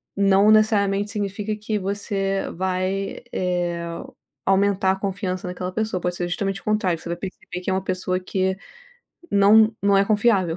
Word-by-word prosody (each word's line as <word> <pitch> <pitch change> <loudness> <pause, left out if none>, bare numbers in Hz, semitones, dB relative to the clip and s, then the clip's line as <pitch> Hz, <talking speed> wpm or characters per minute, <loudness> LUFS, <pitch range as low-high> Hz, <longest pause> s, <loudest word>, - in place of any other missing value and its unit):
não 200 +1 +4
necessariamente 205 -2 +3
significa 205 0 -3
que 215 0 -3
você 195 0 -2
vai, 185 +2 -2
eh, 175 -2 -1 0.6
aumentar 195 0 +3
a - - -3
confiança 190 -1 -3
naquela 180 0 -4
pessoa, 215 -5 -2
pode 180 0 -1
ser 175 0 -2
justamente 195 +2 -2
o - - -29
contrário, 205 -6 +1
você - - -10
vai 170 - -2
perceber 185 0 -7
que 180 - -4
é - - +1
uma 190 0 -1
pessoa 185 -1 -1
que 190 0 -1 0.7
não 215 +2 +6
não 200 -1 +4
é 195 - +4
confiável 205 -5 +2
195 Hz, 165 wpm, -23 LUFS, 185-205 Hz, 0.7 s, não